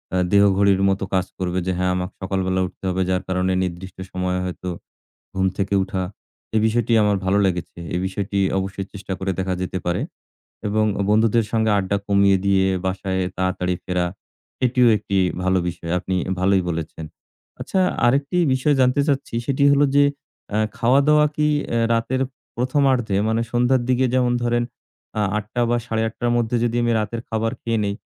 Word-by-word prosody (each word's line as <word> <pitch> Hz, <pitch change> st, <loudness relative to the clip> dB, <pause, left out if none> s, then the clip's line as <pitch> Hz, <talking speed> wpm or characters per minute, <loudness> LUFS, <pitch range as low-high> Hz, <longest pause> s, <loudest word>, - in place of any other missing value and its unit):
আ -, -, +2 dB, 0.2 s
দেহঘড়ির 100 Hz, -1 st, +4 dB
মতো 95 Hz, 0 st, 0 dB
কাজ 95 Hz, -1 st, +2 dB
করবে 90 Hz, 0 st, -1 dB
যে, -, -, +1 dB
হ্যাঁ, 90 Hz, 0 st, +1 dB
আমাকে 90 Hz, 0 st, -2 dB
সকালবেলা 95 Hz, -1 st, -1 dB
উঠতে -, -, -17 dB
হবে। 95 Hz, +1 st, -1 dB
যার 95 Hz, 0 st, 0 dB
কারণে 90 Hz, 0 st, 0 dB
নির্দিষ্ট 90 Hz, +1 st, -6 dB
সময়ে 90 Hz, 0 st, -1 dB
হয়তো 90 Hz, 0 st, -5 dB, 0.7 s
ঘুম 95 Hz, 0 st, +2 dB
থেকে 100 Hz, 0 st, 0 dB
উঠা। 95 Hz, 0 st, -3 dB, 0.5 s
এই 110 Hz, -, +4 dB
বিষয়টি 115 Hz, +1 st, 0 dB
আমার 105 Hz, -1 st, +2 dB
ভালো 95 Hz, +2 st, +2 dB
লেগেছে। 90 Hz, -2 st, -3 dB, 0.2 s
এই 90 Hz, -, 0 dB
বিষয়টি 100 Hz, +1 st, -3 dB, 0.2 s
অবশ্যই 95 Hz, 0 st, -4 dB
চেষ্টা 95 Hz, -1 st, -7 dB
করে 95 Hz, 0 st, -2 dB
দেখা 95 Hz, 0 st, -1 dB
যেতে 90 Hz, 0 st, -3 dB
পারে। 90 Hz, -, 0 dB, 0.7 s
এবং 110 Hz, +1 st, +1 dB
অ -, -, +2 dB
বন্ধুদের 110 Hz, +1 st, +3 dB
সংগে 110 Hz, -1 st, +2 dB
আড্ডা 100 Hz, +1 st, 0 dB
কমিয়ে 100 Hz, -1 st, +4 dB
দিয়ে 95 Hz, -1 st, +3 dB, 0.2 s
বাসায় 95 Hz, 0 st, -1 dB, 0.2 s
তাড়াতাড়ি 90 Hz, -1 st, 0 dB
ফেরা। 90 Hz, -1 st, 0 dB, 0.6 s
এটিও 125 Hz, 0 st, +4 dB
একটি 100 Hz, -1 st, -2 dB, 0.3 s
ভালো 95 Hz, 0 st, +2 dB
বিষয়। 85 Hz, -1 st, -5 dB
আপনি 95 Hz, +1 st, -3 dB
এ -, -, -1 dB
ভালোই 95 Hz, +1 st, +3 dB
বলেছেন। 80 Hz, -1 st, -4 dB, 0.6 s
আচ্ছা 190 Hz, -, -1 dB, 0.3 s
আরেকটি 140 Hz, +7 st, +2 dB, 0.2 s
বিষয় 135 Hz, +3 st, +2 dB
জানতে 130 Hz, +2 st, +3 dB
চাচ্ছি। 140 Hz, -4 st, -1 dB
সেটি 140 Hz, +2 st, +1 dB
হলো 140 Hz, +1 st, +4 dB
যে, 145 Hz, -, +6 dB, 0.5 s
অ্যা 105 Hz, -, 0 dB, 0.2 s
খাওয়া-দাওয়া 140 Hz, +5 st, +4 dB
কি 150 Hz, 0 st, +2 dB, 0.2 s
অ্যা 115 Hz, -, +1 dB
রাতের 120 Hz, +3 st, 0 dB, 0.3 s
প্রথমার্ধে 130 Hz, -4 st, +1 dB
মানে 110 Hz, +1 st, +1 dB
সন্ধ্যার 125 Hz, +1 st, +2 dB
দিকে 130 Hz, +1 st, +3 dB
যেমন 125 Hz, -1 st, +2 dB
ধরেন 120 Hz, 0 st, +1 dB, 0.6 s
আ -, -, +2 dB, 0.2 s
৮ঃ০০ 110 Hz, +3 st, -3 dB
বা, 120 Hz, -, +2 dB
৮ঃ৩০ 110 Hz, 0 st, -2 dB
র -, -, +2 dB
মধ্যে 120 Hz, 0 st, 0 dB
যদি 120 Hz, 0 st, 0 dB
আমি 120 Hz, -, +2 dB
রাতের 110 Hz, +2 st, -3 dB
খাবার 115 Hz, 0 st, -1 dB
খেয়ে 115 Hz, -1 st, -1 dB
নেই, 100 Hz, -, -1 dB
100 Hz, 175 wpm, -22 LUFS, 95-120 Hz, 0.7 s, যে